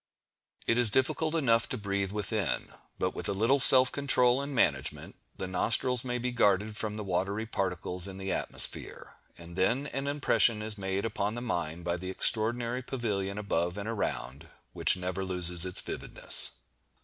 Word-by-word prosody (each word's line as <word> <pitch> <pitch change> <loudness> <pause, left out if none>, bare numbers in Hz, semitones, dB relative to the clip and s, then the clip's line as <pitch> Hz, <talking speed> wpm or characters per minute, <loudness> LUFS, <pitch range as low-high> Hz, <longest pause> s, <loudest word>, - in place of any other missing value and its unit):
It 115 - +1
is 120 -3 +6
difficult 145 +7 0
enough 115 -7 +2
to 130 - -3
breathe 100 -2 -2
within; 105 0 -2 0.2
but - - -1
with - - -3
a - - 0
little 115 +8 +2
self 130 -1 +8
control 130 -2 +2
and 140 +1 -6
management, 70 - -1 0.2
the - - -4
nostrils 115 +6 +2
may 125 -1 -3
be 125 +1 -3
guarded 105 -2 +1
from 105 0 -4
the 105 - -5
watery 100 +3 -2
particles 90 -3 -3
in 95 -1 -9
the 95 0 -4
atmosphere, - - -2 0.2
and 85 0 -12
then 120 +9 +1
an 135 0 -4
impression 130 -6 +2
is 110 -1 -4
made 95 0 -3
upon 105 -1 -2
the 120 - -5
mind 85 -7 -4
by 85 0 -2
the 90 +1 -7
extraordinary 115 +5 +2
pavilion 105 -6 -3
above 90 -3 -2
and 100 +1 -5
around, 80 - -4 0.3
which - - +3
never 90 +1 -4
loses 90 -2 -1
its 90 0 -3
vividness. - - +2
105 Hz, 170 wpm, -29 LUFS, 95-120 Hz, 0.3 s, self